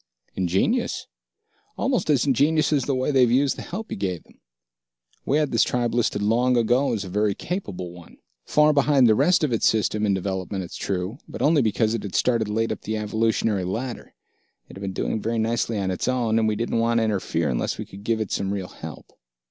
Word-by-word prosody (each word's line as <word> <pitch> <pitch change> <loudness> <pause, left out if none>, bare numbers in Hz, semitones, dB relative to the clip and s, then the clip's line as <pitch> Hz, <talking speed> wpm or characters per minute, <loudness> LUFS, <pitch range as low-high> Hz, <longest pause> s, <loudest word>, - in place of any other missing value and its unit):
"Ingenious. 95 - 0 0.7
Almost 255 - 0
as 140 -5 +3
ingenious 150 +4 +2
as 140 -4 +1
the 140 - 0
way 130 +3 0
they've 130 -3 +4
used 135 +3 +2
the - - -7
help 215 +5 -6
you - - -2
gave 95 -4 -3
them. - - -24 0.9
We 140 - +3
had 150 -2 0
this 115 - +3
tribe 120 -2 -1
listed 110 -4 0
long 120 +4 +2
ago 120 +4 +2
as 105 -3 -3
a - - -7
very 105 +2 0
capable 95 - -5
one, 85 -1 -14 0.3
far 150 0 +4
behind 140 -2 +4
the 110 - +6
rest 155 +9 +3
of 140 -5 +1
its 115 - +2
System 110 -1 +1
in 100 - +2
development, 95 0 -3
it's 90 - -9
true, 95 +6 -3
but - - -5
only 150 -1 +4
because 110 -1 +1
it 115 - -2
had 100 -3 -6
started 115 -4 +1
late 115 +2 0
up - - -4
the 110 0 -3
evolutionary 110 -2 0
ladder. 115 +7 -5 0.5
It - - -13
had 95 - -10
been 100 -1 -3
doing 110 - -2
very 115 +2 -1
nicely 115 0 0
on 95 -2 -1
its 90 - -3
own, 120 -3 +1
and 110 - +2
we 110 - +1
didn't 115 +1 -1
want 115 +1 +2
to 115 - +3
interfere 95 -7 -1
unless - - -1
we - - -5
could 100 +1 -12
give 115 +1 0
it 110 - -3
some 95 0 -1
real 95 -2 -4
help. 80 -5 -10
115 Hz, 220 wpm, -24 LUFS, 100-130 Hz, 0.9 s, the